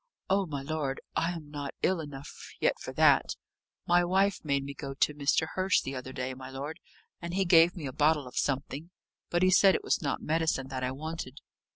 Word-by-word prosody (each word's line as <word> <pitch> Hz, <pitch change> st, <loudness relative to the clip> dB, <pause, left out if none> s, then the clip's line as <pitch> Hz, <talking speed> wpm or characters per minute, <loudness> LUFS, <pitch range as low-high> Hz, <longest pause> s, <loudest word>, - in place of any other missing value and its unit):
"Oh, 195 Hz, -1 st, +2 dB
my 140 Hz, -3 st, -4 dB
lord, 145 Hz, -2 st, -2 dB, 0.2 s
I 165 Hz, -, +1 dB
am 155 Hz, -4 st, -9 dB
not 145 Hz, -2 st, -5 dB
ill 185 Hz, -1 st, +2 dB
enough 145 Hz, -2 st, -8 dB, 0.3 s
yet -, -, +1 dB
for -, -, -6 dB
that. -, -, +4 dB, 0.5 s
My 175 Hz, 0 st, +4 dB
wife 190 Hz, +3 st, +1 dB
made 140 Hz, -2 st, 0 dB
me 140 Hz, +1 st, -6 dB
go 135 Hz, 0 st, -6 dB
to 150 Hz, -, +2 dB
Mr. 150 Hz, +2 st, +1 dB
Hurst 185 Hz, +1 st, +1 dB
the 135 Hz, -, -4 dB
other 130 Hz, 0 st, -6 dB
day, 130 Hz, 0 st, -4 dB
my 130 Hz, 0 st, -9 dB
lord, 145 Hz, +5 st, -6 dB, 0.4 s
and 170 Hz, 0 st, -4 dB
he 195 Hz, 0 st, +2 dB
gave 170 Hz, 0 st, +6 dB
me 165 Hz, -5 st, -6 dB
a 130 Hz, -, -4 dB
bottle 150 Hz, 0 st, +2 dB
of 125 Hz, -, -12 dB
something. 140 Hz, +3 st, -2 dB, 0.4 s
But 175 Hz, +1 st, +1 dB
he 185 Hz, -, +5 dB
said 190 Hz, +1 st, +6 dB
it -, -, -2 dB
was -, -, +1 dB
not 140 Hz, -3 st, -1 dB
medicine 155 Hz, -4 st, 0 dB
that 130 Hz, -1 st, -4 dB
I 125 Hz, -, 0 dB
wanted." 145 Hz, -1 st, -6 dB
150 Hz, 215 wpm, -29 LUFS, 135-170 Hz, 0.5 s, gave